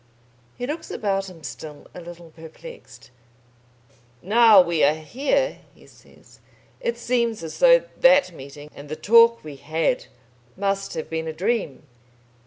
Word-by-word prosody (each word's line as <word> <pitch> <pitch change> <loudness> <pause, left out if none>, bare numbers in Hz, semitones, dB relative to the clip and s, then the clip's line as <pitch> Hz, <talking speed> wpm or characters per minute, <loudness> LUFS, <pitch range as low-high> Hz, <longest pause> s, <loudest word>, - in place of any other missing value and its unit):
He 245 - -4
looks 300 +5 -6
about 195 -3 -2
him 165 -4 -15
still 145 +4 -9
a 180 - -10
little 170 -1 -12
perplexed. 165 - -14 1.1
"Now 220 +1 +6
we 170 -3 +2
are 150 +2 +4
here," 285 - -2 0.2
he - - -20
says, - - -21 0.4
"it 475 -1 -3
seems 235 -5 -1
as 160 - -8
though - - +6 0.2
that 270 -5 +5
meeting 145 -1 -12
and 145 0 -12
the 155 - -4
talk 230 +5 +4
we 150 -3 -10
had 160 +4 -2 0.5
must 195 -1 -2
have 160 - -5
been 160 0 -4
a 160 - -4
dream." 185 - -2
185 Hz, 145 wpm, -22 LUFS, 155-235 Hz, 1.1 s, Now